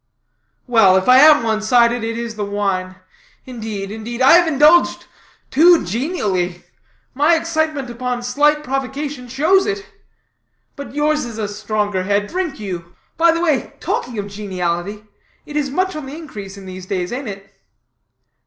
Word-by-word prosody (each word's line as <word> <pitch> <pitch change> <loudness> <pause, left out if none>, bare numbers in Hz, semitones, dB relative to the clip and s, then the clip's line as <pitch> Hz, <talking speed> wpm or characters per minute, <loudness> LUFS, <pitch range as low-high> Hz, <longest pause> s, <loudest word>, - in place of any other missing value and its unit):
"Well, 225 -7 +5
if 190 - -1
I 255 +1 +7
am 295 -3 +7
one 220 -1 0
sided, 235 +1 +3
it 230 0 -3
is 235 -1 -4
the 215 -1 -4
wine. 195 -2 -2 0.5
Indeed, 220 -5 -6
indeed, 225 +2 -6
I 260 +1 +6
have 345 +1 +6
indulged 310 +3 +4 0.5
too 335 - +5
genially. 190 - -2 0.5
My 295 +5 +3
excitement 315 -4 -1
upon 245 0 -4
slight 295 +4 +2
provocation 270 0 -4
shows 315 +10 +2
it. 400 -1 -3 0.9
But 280 -1 -9
yours 300 +1 +1
is 235 -3 -7
a 215 -2 -2
stronger 205 -1 -2
head; 200 +2 0
drink 340 - -4
you. 180 -4 -7 0.2
By 335 0 +4
the 335 +1 -1
way, 310 -6 0
talking 245 -2 -3
of 205 - -3
geniality, 195 0 -4 0.4
it 295 - -10
is 290 -2 0
much 370 +5 -1
on 305 -3 -6
the 285 +3 -8
increase 205 -11 -9
in 195 - -11
these 185 0 -9
days, 185 +1 -3
ain't 260 0 -5
it?" 195 0 -10
240 Hz, 160 wpm, -18 LUFS, 205-295 Hz, 0.9 s, I